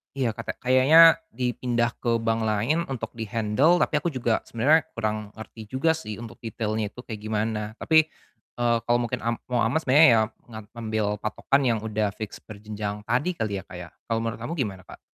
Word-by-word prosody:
Iya 130 -4 0
katek - - -7
kayaknya 145 +7 +7 0.2
dipindah 120 -1 0
ke 120 -1 +1
bank 115 -1 0
lain 120 +11 0
untuk 120 -5 -5
di-handle, 115 - +1
tapi 150 - 0
aku 170 - -3
juga 120 -7 0
sebenernya 145 +7 +3
kurang 110 -2 -3
ngerti 110 0 -10
juga 130 +8 +1
sih 160 -10 -5
untuk 115 +2 -10
detailnya 110 -1 -3
itu 125 +4 -11
kayak 110 -4 -7
gimana, 110 0 -2
tapi, 160 +2 +3 0.5
eee, 120 -1 +2
kalau 120 - +4
mungkin 120 - -3
am 115 +1 -1 0.2
mau 120 - +2
aman 115 +2 +1
sebenernya 160 0 +6
ya, 110 - +4 0.3
ngam 110 -2 -9
ngambil 110 -2 -2
patokan 135 +5 0
yang 115 -2 +1
udah 105 -2 -1
fix 110 -2 -7
berjenjang 105 -1 -6
tadi 130 +11 0
kali 105 -6 -2
ya, - - -11
Kak, 90 - -11
ya. 90 -1 -8 0.2
Kalau 115 0 -1
menurut 115 -1 -3
kamu 135 +9 -4
gimana, 100 - -4
Kak? - - -12
115 Hz, 190 wpm, -25 LUFS, 110-130 Hz, 0.5 s, kayaknya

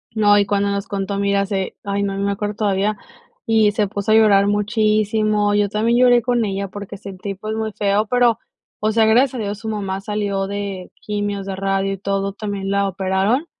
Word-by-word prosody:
No, 205 -1 +5
y 200 - +2
cuando 200 0 +1
nos 200 0 -3
contó, 200 0 -3
mira, 200 0 +1
se 195 -2 -3
ay, 200 0 -2
no, 195 -1 -2
me 200 0 0
acuerdo 205 +1 -3
todavía, 205 0 0 0.5
y 220 -2 +3
se 210 -1 +1
puso 200 +1 -2
a - - +6
llorar 205 -3 +5
muchísimo, 210 0 +1
yo 205 0 +2
también 225 +4 +1
lloré 245 -2 +5
con 245 -2 +1
ella 200 0 -3
porque 200 +1 -8
sentí, 195 0 -7
pues, 215 +3 -5
muy 220 0 -2
feo, 205 +1 +1
pero, 240 -1 +3 0.4
o 215 +1 +1
sea, 220 0 +3
gracias 245 +4 +3
a - - -3
Dios, 205 0 -4
su 220 0 -5
mamá 195 -3 -3
salió 200 -1 -2
de 200 -2 -5
quimios, 205 -1 -3
de 195 -1 -4
radio 195 0 -1
y - - -5
todo. 195 0 -2
También 200 -2 -4
la 200 0 +1
operaron, 195 - 0
205 Hz, 205 wpm, -20 LUFS, 195-215 Hz, 0.5 s, a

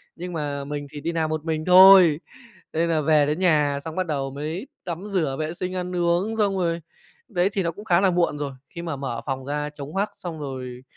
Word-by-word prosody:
Nhưng 180 +1 -6
mà 145 -3 -3
mình 145 0 -5
thì 145 - -8
đi 165 +3 -2
làm 160 -2 -1
một 155 0 -3
mình 155 -1 -2
thôi. 185 -4 +8 0.5
Nên 165 +1 +1
là 160 -2 +2
về 150 -1 +4
đến 150 +2 -1
nhà 150 -6 +2
xong, 160 +1 -6
bắt 185 - 0
đầu 140 -4 -2
mới 155 - -5 0.2
tắm 175 +3 -5
rửa 160 -9 0
vệ 155 +1 -3
sinh 185 +1 -4
ăn 180 0 -3
uống 175 +6 +1
xong 200 -3 +1
rồi, 170 -2 0 0.5
đấy, 180 +1 +1
thì 195 -2 0
nó 170 - 0
cũng 205 +6 -11
khá 175 -4 +3
là 190 -1 +4
muộn 170 -4 +1
rồi. 145 -2 -3 0.2
Khi 170 - -8
mà 165 -4 -3
mở 135 -4 -4
phòng 135 -2 -3
ra 150 +2 -3
trống 145 0 -9
hoắc, 200 +2 -1
xong 170 -3 -7
rồi 130 -3 -6
160 Hz, 235 wpm, -24 LUFS, 145-180 Hz, 0.5 s, thôi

